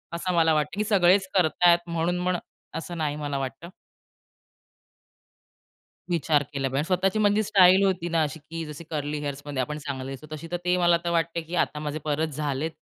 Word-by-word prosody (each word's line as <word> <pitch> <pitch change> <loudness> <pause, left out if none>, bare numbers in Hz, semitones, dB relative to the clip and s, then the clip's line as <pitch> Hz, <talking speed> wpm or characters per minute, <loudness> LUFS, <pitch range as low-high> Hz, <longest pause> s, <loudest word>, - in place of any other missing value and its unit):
असं 180 +2 -2
मला 165 -1 +4
वाटतं 150 +4 -1
की - - +2
सगळेच 190 -2 +4
करत 180 -5 +3
आहेत 175 0 +7
म्हणून 170 +1 0
म्हण 180 0 0 0.4
असं 170 +1 -6
नाही 150 -2 -1
मला 145 -2 -3
वाटतं. 135 +5 -5 2.4
विचार 155 -3 +2
केला 135 -1 -1
पाहिजे. 135 +1 -3
आणि 145 - 0
स्वतःची 190 +3 +1
म्हणजे 210 0 +3
स्टाईल 190 -1 +6
होती 180 -3 0
ना, 165 -1 +2
अशी 150 +1 -4
की 165 +2 -7
जशी 150 +1 -8
कर्ली 150 -1 -3
हेअर्स 145 -1 -4
मध्ये 140 -3 -2
आपण 150 +3 -3
चांगले 135 -3 -5
दिसू, 135 +3 -9
तशी 155 +2 -7
तर 175 - 0
ते 180 0 +2
मला 175 -1 +4
तर - - +1
वाटते, 170 0 0
की 165 +2 -6
आता 150 -3 0
माझे 150 0 -4
परत 155 +1 0
झालेत 150 +1 -3
160 Hz, 195 wpm, -26 LUFS, 150-175 Hz, 2.4 s, आहेत